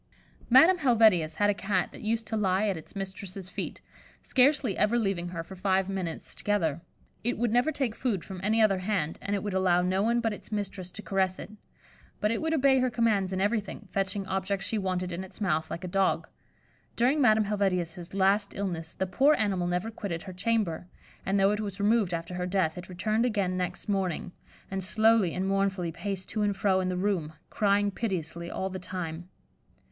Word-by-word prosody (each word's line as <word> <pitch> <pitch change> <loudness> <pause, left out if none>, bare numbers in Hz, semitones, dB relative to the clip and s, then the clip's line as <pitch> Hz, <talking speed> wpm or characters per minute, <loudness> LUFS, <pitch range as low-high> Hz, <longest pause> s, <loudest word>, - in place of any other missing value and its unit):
Madame 320 +9 +7
Helvetius 220 - +4
had 205 +3 +3
a - - 0
Cat 195 -1 -1
that - - -11
used 225 +1 -1
to 220 - -3
lie 200 0 +2
at 195 - 0
its 160 +5 -11
mistress's 195 -1 -6
feet, - - -5 0.4
scarcely 260 -5 +3
ever 210 +3 +2
leaving 195 -6 0
her 170 -2 -5
for 190 - -10
five 190 0 +1
minutes 185 -4 -4
together. 170 -7 0 0.4
It 240 +2 0
would 235 -1 0
never 245 +6 +3
take 270 -6 -1
food 215 -8 -2
from 190 -2 -7
any 220 +3 +3
other 195 -3 +3
hand, 185 -5 -1
and 205 - -1
it 195 - -3
would 205 -2 -3
allow 180 -2 +3
no 185 +2 +1
one 235 +3 +2
but 225 -2 0
its 210 - -11
mistress 195 -3 -4
to 210 +3 -8
caress 190 -2 0
it; - - -8 0.7
but 210 - +1
it 230 - -1
would 320 0 0
obey 275 -4 +4
her 255 0 +2
commands 215 -6 +1
in 190 - -1
everything, 205 0 -1
fetching 195 0 -1
objects 190 +1 -2
she 220 - -1
wanted 185 -2 -2
in 175 +2 -4
its 190 - -12
mouth, 160 -6 0
like 170 - -5
a - - -3
dog. 195 +1 +1 0.7
During 265 +6 +3
Madame 220 -4 +5
Helvetius's 180 -3 -1
last 200 +1 +2
illness, 170 -5 -4
the 190 - -1
poor 275 +11 +4
animal 190 -7 0
never 180 +5 -1
quitted 185 -7 -5
her 185 - -8
chamber, 185 -4 -1 0.4
and 195 +1 +2
though 195 +1 +4
it 210 - -1
was 205 -2 -4
removed 210 -2 +3
after 170 +1 -4
her 180 0 -2
death, 180 -4 +1
it 180 0 -9
returned 215 +5 0
again 200 -6 0
next 180 0 -3
morning, 190 -4 -1 0.4
and 190 0 -2
slowly 215 -2 +3
and 190 +1 -1
mournfully 195 -3 0
paced 185 +3 -5
to 215 - -1
and 205 -1 +1
fro 190 -2 +2
in 185 -1 0
the 180 - -2
room, 180 -5 -1 0.2
crying 205 -1 +2
piteously 170 -5 -3
all 190 0 -3
the 185 - -5
time. 175 -1 -5
195 Hz, 205 wpm, -28 LUFS, 180-215 Hz, 0.7 s, Madame